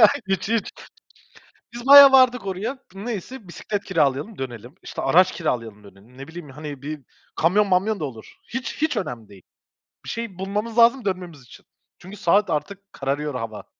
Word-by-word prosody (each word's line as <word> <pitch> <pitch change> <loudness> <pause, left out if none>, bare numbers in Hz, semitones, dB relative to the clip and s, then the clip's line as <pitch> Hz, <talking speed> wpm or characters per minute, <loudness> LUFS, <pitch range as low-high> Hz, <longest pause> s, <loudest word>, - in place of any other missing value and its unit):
Ya, 215 - +9 0.2
hiç, 195 0 -1
hiç. 225 -1 0 1.0
Biz 240 +2 -8
bayağı 280 0 +11
vardık 255 -4 +5
oraya. 200 +8 -4 0.2
Neyse 210 +2 -7
bisiklet 200 +3 -5
kiralayalım 155 +3 0
dönelim, 120 +1 -7
işte - - -6
araç 180 +7 +4
kiralayalım 115 - -4
dönelim. 100 +5 -18
Ne 135 - -9
bileyim, 165 -2 -10
hani, 145 0 -8
bir 150 +1 -6 0.3
kamyon 200 +6 +2
mamyon 195 +3 +1
da 150 - -2
olur. 115 -6 -10 0.2
Hiç, 260 +3 -5
hiç 315 - 0
önemli 120 - -5
değil. 100 -2 -15 0.6
Bir - - -11
şey 230 -6 -5
bulmamız 210 +4 -3
lazım, 235 +2 +5
dönmemiz 180 -7 -4
için. 125 - -17 0.3
Çünkü 190 +3 -11
saat 200 +1 +2
artık; 195 +6 -4
kararıyor 140 +2 -3
hava. 115 -4 -6
185 Hz, 165 wpm, -23 LUFS, 140-215 Hz, 1.0 s, bayağı